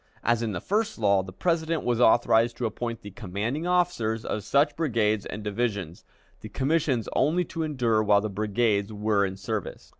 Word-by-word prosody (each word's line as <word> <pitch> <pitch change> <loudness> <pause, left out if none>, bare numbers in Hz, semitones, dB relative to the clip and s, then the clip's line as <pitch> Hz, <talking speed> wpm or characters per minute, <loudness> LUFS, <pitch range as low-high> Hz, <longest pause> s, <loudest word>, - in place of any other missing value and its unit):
As 120 -1 +2
in 115 -2 -1
the 90 - -3
first 210 - -1
law, 100 -3 +3
the 95 0 -9
President 165 - -1
was 120 -1 0
authorized 115 0 +4
to 120 - -2
appoint 115 +1 -4
the 100 - -8
commanding 115 - -3
officer 175 -12 +1
of 105 - -3
such 140 +8 +2
brigades 110 -9 0
and 105 - -6
divisions, 105 -5 -3 0.3
the 110 - -9
commissions 135 -1 0
only 160 +6 +2
to 165 +1 -5
endure 125 -8 +1
while 105 -1 +4
the 110 - -2
brigades 105 0 0
were 105 -1 +1
in 95 -1 -3
service. 105 +1 -5
115 Hz, 180 wpm, -26 LUFS, 105-140 Hz, 0.3 s, authorized